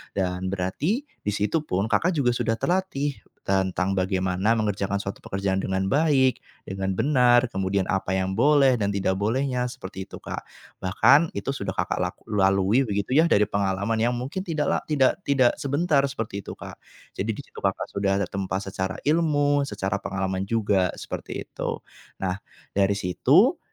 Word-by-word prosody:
Dan 90 Hz, -1 st, -1 dB
berarti 100 Hz, -, -1 dB, 0.2 s
di 105 Hz, -, 0 dB
situ 105 Hz, +11 st, 0 dB
pun 95 Hz, +3 st, 0 dB
Kakak 165 Hz, +12 st, +3 dB
juga 130 Hz, -5 st, +2 dB
sudah 115 Hz, -2 st, 0 dB
terlatih 145 Hz, -6 st, -1 dB, 0.3 s
tentang 95 Hz, -1 st, 0 dB
bagaimana 95 Hz, +2 st, +1 dB
mengerjakan 100 Hz, -2 st, -1 dB
suatu 100 Hz, -, -5 dB
pekerjaan 95 Hz, 0 st, -2 dB
dengan 95 Hz, 0 st, -1 dB
baik, 140 Hz, -4 st, +3 dB, 0.2 s
dengan 95 Hz, 0 st, -3 dB
benar, 125 Hz, -1 st, +4 dB
kemudian 95 Hz, 0 st, 0 dB
apa 95 Hz, 0 st, 0 dB
yang 95 Hz, 0 st, -1 dB
boleh 140 Hz, -4 st, +5 dB
dan 100 Hz, -, +1 dB
tidak 95 Hz, -1 st, 0 dB
bolehnya 125 Hz, +4 st, 0 dB
seperti 95 Hz, -5 st, -8 dB
itu -, -, -10 dB
Kak. -, -, -6 dB, 0.4 s
Bahkan 135 Hz, -, +4 dB
itu 100 Hz, +7 st, -2 dB
sudah 100 Hz, -8 st, -4 dB
Kakak -, -, -1 dB
lak -, -, -2 dB
lalui 100 Hz, +4 st, +3 dB
begitu 100 Hz, +2 st, -2 dB
ya 165 Hz, -, +5 dB
dari 105 Hz, -10 st, +4 dB
pengalaman 100 Hz, +3 st, 0 dB
yang 120 Hz, +2 st, +1 dB
mungkin 135 Hz, +10 st, -4 dB
tidak 155 Hz, -3 st, -1 dB
la -, -, +2 dB
tidak 140 Hz, -4 st, +2 dB
tidak 130 Hz, -3 st, +4 dB
sebentar 145 Hz, +1 st, +2 dB
seperti 115 Hz, -6 st, -4 dB
itu -, -, -7 dB
Kak. -, -, -10 dB, 0.4 s
Jadi -, -, 0 dB
di -, -, -7 dB
situ -, -, -12 dB
Kakak -, -, -1 dB
sudah 95 Hz, -1 st, 0 dB
tertempa 95 Hz, 0 st, -2 dB
secara 95 Hz, -1 st, -3 dB
ilmu, 145 Hz, -2 st, +2 dB
secara 95 Hz, -5 st, -2 dB
pengalaman 95 Hz, 0 st, -2 dB
juga 100 Hz, -4 st, +2 dB
seperti -, -, -6 dB
itu. -, -, -4 dB, 0.4 s
Nah, 95 Hz, +1 st, -1 dB, 0.4 s
dari 100 Hz, 0 st, +3 dB
situ 90 Hz, -2 st, +3 dB
100 Hz, 160 wpm, -25 LUFS, 95-135 Hz, 0.4 s, boleh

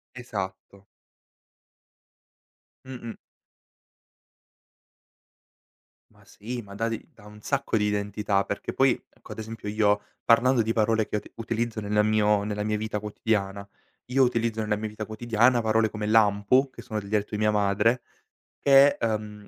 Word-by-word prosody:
Esatto. 100 Hz, -4 st, -7 dB, 2.0 s
Mh-mh. 125 Hz, -3 st, -8 dB, 3.0 s
Ma -, -, -23 dB
sì, 120 Hz, +4 st, -7 dB
ma 100 Hz, -2 st, -12 dB
dà 115 Hz, +3 st, -1 dB
de 115 Hz, -, -5 dB
dà 110 Hz, -4 st, -18 dB
un 105 Hz, 0 st, -13 dB
sacco 140 Hz, -1 st, -1 dB
di 105 Hz, -, +1 dB
identità, 105 Hz, -1 st, 0 dB
perché 100 Hz, -, -5 dB
poi, 135 Hz, 0 st, +4 dB, 0.2 s
ecco, -, -, -16 dB
ad -, -, -7 dB
esempio, 110 Hz, -1 st, -7 dB
io, 105 Hz, -1 st, +2 dB, 0.2 s
parlando 120 Hz, +2 st, +4 dB
di 110 Hz, +1 st, 0 dB
parole 110 Hz, -1 st, +1 dB
che -, -, -4 dB
uti -, -, -9 dB
utilizzo 115 Hz, 0 st, -3 dB
nel 105 Hz, +1 st, +1 dB
mio 105 Hz, -1 st, +2 dB
nella 105 Hz, 0 st, -3 dB
mia 105 Hz, 0 st, -1 dB
vita 105 Hz, 0 st, -3 dB
quotidiana, 100 Hz, -1 st, -2 dB, 0.4 s
io 135 Hz, +1 st, +4 dB
utilizzo, 115 Hz, -3 st, 0 dB
nella 105 Hz, -1 st, 0 dB
mia 110 Hz, +1 st, -4 dB
vita 110 Hz, 0 st, -6 dB
quotidiana, 120 Hz, +3 st, +2 dB
parole 110 Hz, 0 st, +2 dB
come 105 Hz, 0 st, -5 dB
lampo, 110 Hz, +4 st, +3 dB
che -, -, -12 dB
sono 110 Hz, -4 st, -4 dB
del 100 Hz, -1 st, -10 dB
dialetto 105 Hz, -1 st, 0 dB
di 105 Hz, -, -2 dB
mia 105 Hz, 0 st, +2 dB
madre, 105 Hz, +4 st, +2 dB, 0.6 s
che 140 Hz, +1 st, +6 dB
è, -, -, -1 dB
uhm, 105 Hz, -2 st, -4 dB
110 Hz, 150 wpm, -26 LUFS, 105-115 Hz, 3.0 s, che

